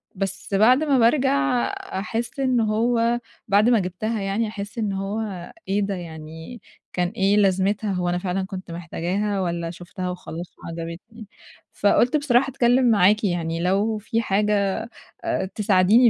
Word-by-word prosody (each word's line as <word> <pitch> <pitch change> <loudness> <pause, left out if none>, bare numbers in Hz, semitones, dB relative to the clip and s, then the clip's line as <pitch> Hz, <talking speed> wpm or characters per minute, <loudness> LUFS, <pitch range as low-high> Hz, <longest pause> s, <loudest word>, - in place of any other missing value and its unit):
بس 195 +1 -4
بعد 245 +8 +5
ما 285 -3 +3
بارجع 240 - +3
أحس 235 - -4
إن 255 -2 +2
هو 230 +2 +2 0.3
بعد 205 +3 +4
ما 235 -2 +5
جِبتها 205 +4 -2
يعني، 200 +3 0
أحس 205 0 -7
إن 210 -3 -1
هو 195 -2 -4 0.2
إيه 200 +2 +1
ده 200 -1 -1
يعني 160 +4 -9 0.3
كان 180 -1 +1
إيه 195 +2 +2
لازمتها، 200 +1 +2
هو 180 -2 -1
أنا 175 - 0
فعلًا 185 +1 -2
كنت 190 -2 -8
محتاجاها 180 +4 -2
والًا 170 -2 -2
شُفتها 180 +1 -6
وخلاص 175 -1 -7
وعجبتني؟ 170 +7 -8 0.5
فقُلت 240 +7 +3
بصراحة 270 -2 +2
أتكلم 250 -1 +3
معاكِ 210 +1 +4
يعني 165 -4 -1
لو 200 +5 +1
في 225 +2 -1
حاجة 210 +1 0 0.3
آآ، 335 - 0
تساعديني 210 +4 +5
200 Hz, 145 wpm, -23 LUFS, 180-230 Hz, 0.5 s, بعد